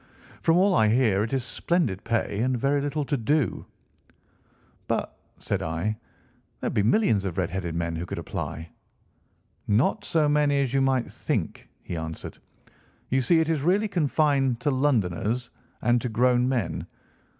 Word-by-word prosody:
From 165 +1 +3
all 190 +2 +4
I 110 -11 +4
hear 110 -3 +3
it 110 - -2
is 135 -2 0
splendid 125 - -1
pay 110 -3 -1
and 125 +2 +1
very 140 +3 +1
little 145 +1 -2
to 145 - 0
do.' 140 +3 0 1.2
"'But,' - - -2 0.2
said - - -2
I, 85 +7 -2 0.6
'there - - -2
would - - -7
be - - +2
millions 110 - +3
of 95 -4 -4
red 90 -3 -1
headed 90 -3 -3
men 85 -1 -2
who 85 +2 -4
would - - -4
apply.' 80 +2 -5 1.0
"'Not 105 +6 +2
so 155 -2 +2
many 145 -1 +2
as 135 -2 -1
you 135 - +3
might 130 -2 +1
think,' - - -3
he 85 - -5
answered. 80 0 -6 0.7
'You 130 +1 +3
see 160 +6 +4
it 160 - -1
is 160 -3 +1
really 190 +8 +2
confined 145 - +1
to 145 - +1
Londoners, 120 - 0 0.3
and 120 0 +3
to 125 - -2
grown 125 +2 +2
men. 105 - -2
125 Hz, 165 wpm, -26 LUFS, 105-145 Hz, 1.2 s, all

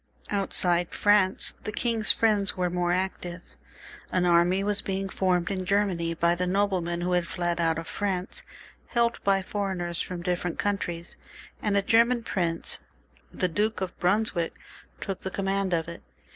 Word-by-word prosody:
Outside 180 -3 +1
France 205 -2 +3
the 215 - -4
king's 225 -1 +3
friends 210 -4 +2
were 180 -1 0
more 175 0 0
active. 180 -1 -2 0.7
An 180 -1 +2
army 175 +2 +4
was 205 0 0
being 195 0 -2
formed 180 -2 +1
in 185 -1 -2
Germany 180 -4 +1
by 170 +1 +3
the 180 +1 -1
noblemen 180 -3 0
who 180 +1 -1
had 175 -1 +1
fled 175 -1 -1
out 165 -1 +2
of 165 - -4
France, 190 -1 -3 0.5
helped 235 -1 +1
by 195 -1 +3
foreigners 185 -4 -2
from 180 -2 -5
different 180 -1 -1
countries, 175 -4 -2 0.4
and 205 -2 +1
a 200 - +2
German 235 +3 +4
prince, 170 -6 -1 0.5
the 185 - 0
Duke 210 +4 0
of 185 -1 -4
Brunswick, 180 -2 +1 0.4
took 195 -2 -4
the 190 - -3
command 195 0 -1
of 165 -2 0
it. 170 - -8
185 Hz, 160 wpm, -27 LUFS, 175-200 Hz, 0.7 s, army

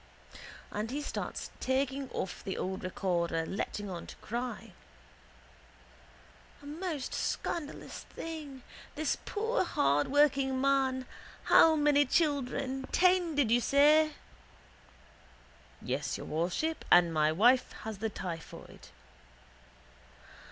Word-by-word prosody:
And 210 +2 -3
he 275 +4 -3
starts 295 - -5
taking 270 0 -1
off 190 - -5
the 190 - -4
old 190 0 -3
recorder 170 -3 -1
letting 205 +2 -4
on 180 -3 -6
to - - -10
cry: 240 +2 -5 1.9
—A 285 - -16
most 305 -2 -4
scandalous 300 -4 -3 0.2
thing! 300 -5 -7 0.3
This 305 -1 0
poor 450 +3 0
hardworking 265 - +2
man! 265 -1 +1 0.4
How 320 -1 +6
many 295 -1 +4
children? 270 -3 0
Ten, 360 -3 +3
did 275 -6 +2
you 240 +1 +4
say? 300 +4 +5 1.7
—Yes, - - -2
your - - -8
worship. 180 - -2
And 175 -1 +6
my 155 0 +3
wife 240 +10 +4
has 220 -2 -6
the 220 +1 -1
typhoid. 170 -5 -8
265 Hz, 105 wpm, -31 LUFS, 200-295 Hz, 1.9 s, How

